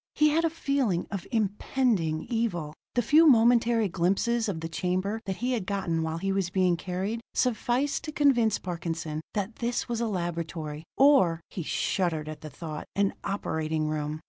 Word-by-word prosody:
He 300 0 +5
had 320 +3 +2
a 330 - +3
feeling 275 - 0
of 195 -3 -4
impending 205 -6 0
evil. 205 -11 -1 0.2
The 245 - +2
few 315 +7 +6
momentary 235 -3 +5
glimpses 200 +7 +1
of 175 -5 -3
the 165 - -3
chamber 185 +6 -1
that 190 - -2
he 245 +6 -2
had 220 -7 -2
gotten 185 -5 -1
while 160 0 -2
he 195 +3 -1
was 195 -2 0
being 185 -1 +2
carried, 190 +6 -3
sufficed 250 +3 +1
to 305 - -4
convince 245 -8 +3
Parkinson 165 -3 -4
that 205 +2 -2
this 240 0 -1
was 235 -1 -2
a 235 - +1
laboratory, 165 -5 -4
or 265 - +5
he 180 - -4
shuddered 160 -1 -1
at 155 0 -7
the 155 - -7
thought 155 +1 -7
an 200 -1 +2
operating 160 -5 -1
room. 150 0 -3
195 Hz, 170 wpm, -28 LUFS, 165-235 Hz, 0.2 s, few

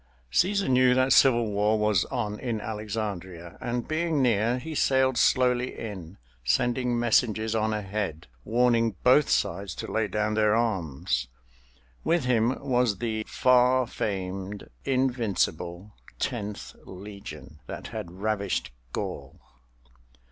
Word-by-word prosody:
Cæsar 200 - +2
knew 125 -1 +4
that 130 0 +4
civil 120 -5 +5
war 105 +2 +2
was 105 -5 +2
on 105 -5 -3
in 120 -4 -2
Alexandria, 100 -6 -5
and 120 0 -3
being 160 -1 0
near 120 -1 +2
he 160 +5 -6
sailed 130 -3 +2
slowly 125 0 +2
in, 95 -5 -7 0.3
sending 120 - +1
messengers 110 -2 +2
on 110 -1 +1
ahead 100 -6 -3 0.2
warning 115 - +2
both 135 +4 +5
sides 95 +1 0
to - - -6
lay 110 -1 +1
down 105 +2 -1
their 105 0 +3
arms. 80 - -1 0.8
With 170 -5 +1
him 120 0 +2
was 125 -5 +2
the 110 -1 -2
far 125 0 +4
famed 95 -1 -4 0.2
invincible 105 -8 -1 0.2
Tenth 105 -5 -4
Legion 100 -5 -10
that - - -7
had 85 - -6
ravished 100 -2 -2 0.2
Gaul. - - -5
110 Hz, 120 wpm, -27 LUFS, 100-125 Hz, 0.8 s, civil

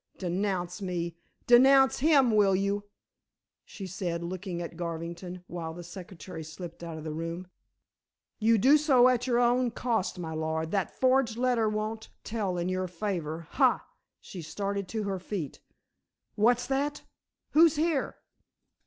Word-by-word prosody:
Denounce 180 0 -2
me; 175 -3 -3 0.3
denounce 265 +2 +6
him, 275 -4 +5
will 205 -3 +4
you?" 200 +1 -1 0.8
she 195 - -9
said, 175 -2 -3
looking 180 0 -4
at 170 -1 -6
Garvington 170 +2 -5
while 165 -2 -6
the 175 - -8
secretary 175 -1 -9
slipped 170 +2 -9
out 165 -2 -6
of 155 - -8
the 155 -1 -4
room; 165 +3 -4 0.9
"you 225 +1 +4
do 275 +8 +6
so 265 -5 +5
at 250 0 0
your 240 -2 +2
own 245 +1 +3
cost, 225 -5 -1
my 165 -3 -5
lord. 160 +1 -2
That 195 -3 -1
forged 255 -3 +3
letter 245 -3 +2
won't 215 +1 -3
tell 205 -5 -2
in 175 0 -1
your 185 0 -1
favor. 170 -4 -4
Ha!" - - +3 0.3
she 180 - -9
started 200 +4 -3
to 220 +1 -3
her 195 -2 -2
feet. 180 -5 -5 0.7
"What's 240 +3 +3
that! 285 +2 -1 0.5
Who's 325 0 +6
here?" 310 -2 0
195 Hz, 145 wpm, -29 LUFS, 170-240 Hz, 0.9 s, denounce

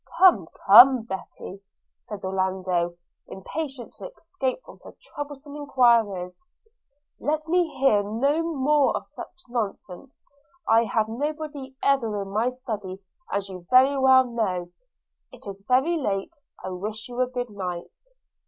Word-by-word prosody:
'Come, 290 - +5 0.2
come, 245 +4 +8
Betty,' 190 -2 -8 0.4
said 210 -2 -9
Orlando, 185 -2 -1 0.3
impatient 270 +5 -6
to - - -9
escape 330 - -4
from - - -14
her - - -13
troublesome 290 0 -9
enquiries, 235 -10 +2 0.8
'let 310 +1 -2
me 345 -1 +1
hear 260 -6 +4
no 255 +10 0
more 300 -3 +2
of - - -8
such 355 0 -11
nonsense. 230 0 -6 0.4
I 225 +1 +4
have 220 0 0
nobody 290 +2 -5
ever 230 -7 +1
in 195 - -10
my 220 +5 +1
study, 215 -7 -6 0.3
as 200 0 -2
you 190 -1 -8
know 175 - -16
very 260 +2 +5
well. 235 -9 +3 0.6
It - - -14
is 200 -1 -8
very 270 +8 +2
late 205 +2 -3 0.2
– - - -14
I - - -3
wish 210 +4 -6
you 245 0 -3
a 255 - +2
good 245 -2 -5
night.' 180 - -7
240 Hz, 140 wpm, -25 LUFS, 195-275 Hz, 0.8 s, come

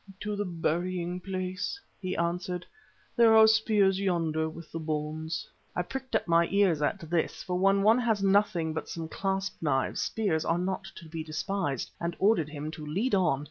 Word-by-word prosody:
"To 210 0 -2
the 205 0 -2
burying 175 +1 -1
place," 185 - -3 0.2
he 185 -1 -3
answered. 180 +1 -2 0.5
"There 230 -2 +6
are 220 - +9
spears 215 -3 +3
yonder 165 -5 0
with 165 0 -11
the 165 - -4
bones." 155 +1 -3 0.3
I 180 - 0
pricked 265 +6 -5
up - - +1
my 170 0 +4
ears 190 -6 +3
at 145 - 0
this 165 0 -1
for 180 -1 -2
when 195 +1 +4
one 220 +4 +5
has 225 -5 +1
nothing 190 -5 +2
but 160 - -4
some 165 -1 -5
clasp 195 +2 -2
knives, 135 -4 0
spears 190 -8 0
are 165 - +1
not 185 +2 -2
to 165 - -11
be 160 0 -5
despised 155 - -2
and 170 0 -2
ordered 190 -7 +3
him 150 0 -5
to 155 -1 -8
lead 195 +12 -1
on. 180 -8 +3
180 Hz, 180 wpm, -29 LUFS, 160-195 Hz, 0.5 s, are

